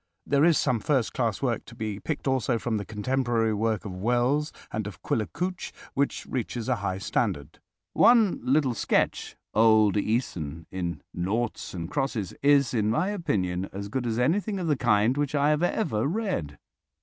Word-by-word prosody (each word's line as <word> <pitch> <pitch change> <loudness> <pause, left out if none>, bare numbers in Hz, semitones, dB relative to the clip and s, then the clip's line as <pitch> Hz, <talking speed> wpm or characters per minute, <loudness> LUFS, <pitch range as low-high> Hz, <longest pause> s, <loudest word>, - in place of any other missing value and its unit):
There 140 0 +3
is 170 -1 +5
some 125 -5 +1
first 130 0 0
class 115 -2 -1
work 120 -3 0
to 120 - -13
be 110 -3 -4
picked 150 +2 -4
also 130 -2 +1
from 115 0 -1
the 100 - -4
contemporary 115 0 0
work 110 +1 -1
of 100 - -5
Wells 125 +9 +1 0.2
and 110 -1 -3
of 105 - -10
Quiller 110 -2 0
Couch 180 +4 -4 0.2
which 140 +1 -1
reaches 120 -2 -3
a 130 -2 +1
high 95 -2 -2
standard. 75 -6 -2 0.3
One 230 -5 +5
little 135 -1 +2
sketch—"Old 110 -1 +2
Œson" 85 - -2
in 85 -5 -4
"Noughts 105 +5 -2
and 85 -2 -4
Crosses"—is, 140 +1 +1
in 105 -3 +1
my 155 - +1
opinion, 95 - -1
as 100 +1 -6
good 125 +2 -2
as 115 -1 -1
anything 195 - +1
of 180 - -3
the 155 -3 +2
kind 120 0 +2
which 145 0 -1
I 145 +1 +3
have 150 +1 +1
ever 160 - 0
read. 180 - -2
120 Hz, 170 wpm, -27 LUFS, 105-140 Hz, 0.3 s, is